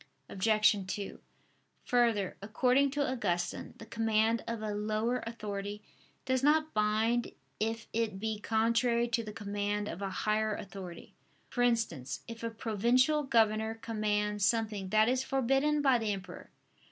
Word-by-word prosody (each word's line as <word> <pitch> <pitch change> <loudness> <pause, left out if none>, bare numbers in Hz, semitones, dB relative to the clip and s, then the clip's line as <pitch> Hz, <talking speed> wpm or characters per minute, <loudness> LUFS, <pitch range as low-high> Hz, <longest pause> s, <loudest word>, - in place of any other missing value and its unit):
Obj. 215 +2 +3 0.2
2: 200 -1 -6 0.7
Further, 230 -6 +2
according 250 +6 +2
to 285 +1 0
Augustine, 180 -9 -2
the 225 - -10
command 225 0 +1
of 230 -2 -3
a 210 -1 -2
lower 215 +4 0
authority 210 -2 -5 0.4
does 260 -1 +1
not 310 +2 +3
bind 220 +3 +1 0.3
if 225 0 -2
it 220 -4 -1
be 220 0 -2
contrary 235 +2 +2
to 235 0 0
the 210 - -6
command 205 0 -2
of 190 - -6
a 195 - -2 0.2
higher 215 0 +1
authority: 185 -3 -9 0.4
for 245 - -1
instance, 225 - 0
if 230 -1 -8
a 230 - -2
provincial 235 +7 +2
governor 220 -4 +2
command 210 -2 -1
something 210 -2 +1
that 215 +2 +4
is 255 +1 +2
forbidden 270 +3 +1
by 265 -3 +4
the 220 -2 -1
emperor. 185 -2 -8
220 Hz, 140 wpm, -31 LUFS, 210-240 Hz, 0.7 s, that